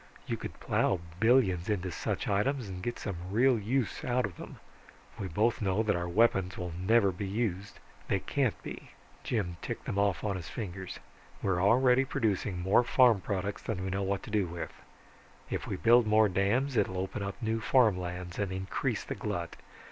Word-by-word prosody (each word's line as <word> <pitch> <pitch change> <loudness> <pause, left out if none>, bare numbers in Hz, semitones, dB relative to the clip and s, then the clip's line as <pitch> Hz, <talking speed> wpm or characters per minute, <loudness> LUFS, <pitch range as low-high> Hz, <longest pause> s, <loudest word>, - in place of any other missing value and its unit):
You - - -2
could - - -8
plow 95 - +1 0.2
billions 110 -7 +3
into 95 -3 -1
such - - -3
items 120 +5 0
and 90 -1 -6
get 120 +6 -3
some 100 -4 -4
real 120 +4 +3
use 120 +3 -1
out 125 0 +1
of 95 -5 -7
them. - - -10 0.6
We 100 - -3
both 110 +8 +1
know 100 +1 +1
that 105 -2 +1
our 85 0 -2
weapons 95 -1 +2
will 90 -2 -4
never 100 +4 +3
be 95 +2 -5
used 100 -2 -2 0.3
they - - +1
can't - - 0
be." - - -8 0.3
Jim 90 -7 -2
ticked - - -5
them 100 - -1
off 100 -2 +1
on 100 -3 -1
his 85 -3 -7
fingers. 95 -4 -6 0.5
"We 100 - +1
already 125 +8 +4
are - - -1
producing 105 -8 -1
more 95 +6 +4
farm 120 -4 +4
products 100 +1 -3
than 95 -4 -3
we 95 - -3
know 95 +1 -1
what 100 0 -1
to - - -9
do 105 -4 +1
with; 85 0 -6 0.8
if - - -3
we - - -2
build 115 +8 +5
more 110 0 +5
dams 105 +9 +1
it'll 95 -4 +1
open 95 +2 -3
up 100 -1 -4
new 110 0 -1
farm 115 -3 +4
lands 90 0 -5
and 100 -2 -1
increase 95 0 -2
the - - -4
glut. - - -4
100 Hz, 195 wpm, -30 LUFS, 95-115 Hz, 0.8 s, build